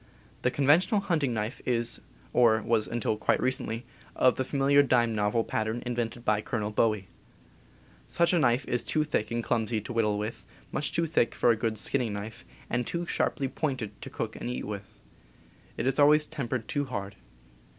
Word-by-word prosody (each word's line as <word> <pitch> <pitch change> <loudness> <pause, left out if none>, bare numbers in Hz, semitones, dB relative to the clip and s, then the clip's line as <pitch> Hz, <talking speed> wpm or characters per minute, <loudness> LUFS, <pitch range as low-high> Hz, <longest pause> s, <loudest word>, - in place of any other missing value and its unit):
The 125 - +2
conventional 155 - +3
hunting 155 -9 0
knife 110 +1 -3
is, 120 -1 +1 0.3
or 110 -2 +4
was 115 -2 +1
until 115 -2 -1
quite - - +1
recently, 125 -2 -1 0.3
of 130 - +4
the 130 - -1
familiar 140 +1 +3
dime 120 -4 +2
novel 105 +2 +1
pattern 110 +2 -2
invented 120 0 -3
by 105 -1 +2
Colonel 105 -2 -3
Bowie. 105 -3 +1 1.0
Such 170 +1 +2
a 175 - +4
knife 125 -2 +2
is 120 - 0
too 155 - +1
thick 150 -8 -1
and 115 0 -2
clumsy 115 -1 0
to 115 - -7
whittle 105 -3 +1
with, 105 +2 -4 0.3
much 150 - -2
too 170 - +1
thick 155 -7 +1
for 120 - +4
a - - +3
good 110 0 -2
skinning 115 0 0
knife, 105 +2 -7 0.2
and 120 0 -1
too 170 0 -2
sharply 140 -4 0
pointed 130 -5 -3
to - - -7
cook - - -4
and - - -5
eat 60 +1 -4
with. - - -7 0.8
It - - -2
is 135 +2 +1
always 150 +1 +6
tempered 130 -6 -4
too 145 -4 -1
hard. 100 -6 -5
120 Hz, 180 wpm, -28 LUFS, 110-140 Hz, 1.0 s, always